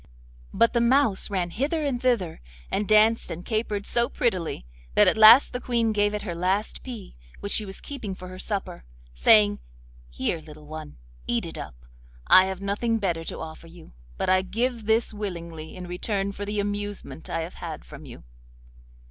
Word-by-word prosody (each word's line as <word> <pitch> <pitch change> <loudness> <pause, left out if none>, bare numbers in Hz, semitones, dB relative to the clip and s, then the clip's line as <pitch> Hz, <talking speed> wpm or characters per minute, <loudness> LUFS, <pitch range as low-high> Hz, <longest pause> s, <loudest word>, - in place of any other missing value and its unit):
But 230 - +3
the 235 - +2
mouse 235 -5 +3
ran 180 -3 -1
hither 300 - -1
and 255 -4 -1
thither, 230 - 0 0.3
and 205 0 -1
danced 215 +1 +4
and 175 +2 -6
capered 215 -2 -2
so 235 0 +2
prettily, 180 - -1 0.3
that - - +6
at - - +5
last 220 +5 +8
the 250 - -2
Queen 235 -3 +1
gave 205 0 +1
it 210 - -4
her 180 -5 -4
last 185 +5 -1
pea, 240 -6 -8 0.3
which 200 - -4
she 215 - +2
was 190 - -6
keeping 230 -9 -6
for 185 - -10
her 185 0 -9
supper, 200 - -4 0.3
saying: 100 - +5 0.5
'Here, - - -2
little 155 -1 -13
one, 155 0 -9 0.3
eat - - 0
it - - -7
up; - - -8 0.5
I 185 - +7
have 190 0 -5
nothing 210 +4 0
better 175 -6 -1
to - - -5
offer 160 +1 -9
you, 165 0 -15 0.2
but - - -2
I 185 0 +4
give 230 +3 -2
this 225 0 +2
willingly 170 -6 -6
in 180 -1 -7
return 195 +3 -2
for 200 +1 -6
the 205 0 -2
amusement 205 -4 -4
I - - -1
have 165 +3 -6
had 165 -3 -6
from 150 0 -11
you. 120 - -12
200 Hz, 185 wpm, -25 LUFS, 170-225 Hz, 0.5 s, last